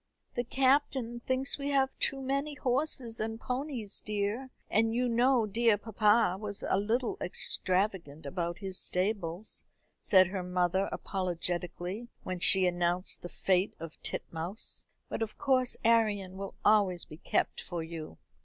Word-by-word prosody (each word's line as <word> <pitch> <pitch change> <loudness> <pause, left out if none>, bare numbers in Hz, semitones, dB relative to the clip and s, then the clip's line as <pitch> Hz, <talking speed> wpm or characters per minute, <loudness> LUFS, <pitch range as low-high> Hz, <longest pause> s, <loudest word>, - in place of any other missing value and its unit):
"The 240 - -1
Captain 260 -2 +1
thinks 260 +3 +1
we 280 0 -2
have 270 -1 +2
too 270 0 0
many 275 +3 -1
horses 255 -3 -1
and 225 +1 -3
ponies, 250 -4 -4
dear; 210 +5 -2 0.2
and 225 +2 +2
you 250 +1 +1
know 240 0 +3
dear 225 +1 +2
papa 210 -2 +3
was 205 -1 -6
a 190 - +2
little 230 +4 0
extravagant 180 -4 -1
about 170 -1 -3
his 190 -2 -6
stables," 185 0 -2 0.4
said 185 -1 +5
her 190 -1 -3
mother 180 +1 0
apologetically, 180 +3 -3 0.2
when 185 -1 -4
she 190 +2 +8
announced 175 +1 0
the 175 - -7
fate 185 +2 +1
of 165 0 -9
Titmouse; 170 +6 -4 0.2
"but - - -5
of 220 -1 -3
course 255 -3 +2
Arion 210 -5 +2
will 195 0 -6
always 200 -5 +3
be 155 - -11
kept - - -1
for 175 -2 -4
you." 160 - -8
210 Hz, 145 wpm, -31 LUFS, 180-240 Hz, 0.4 s, she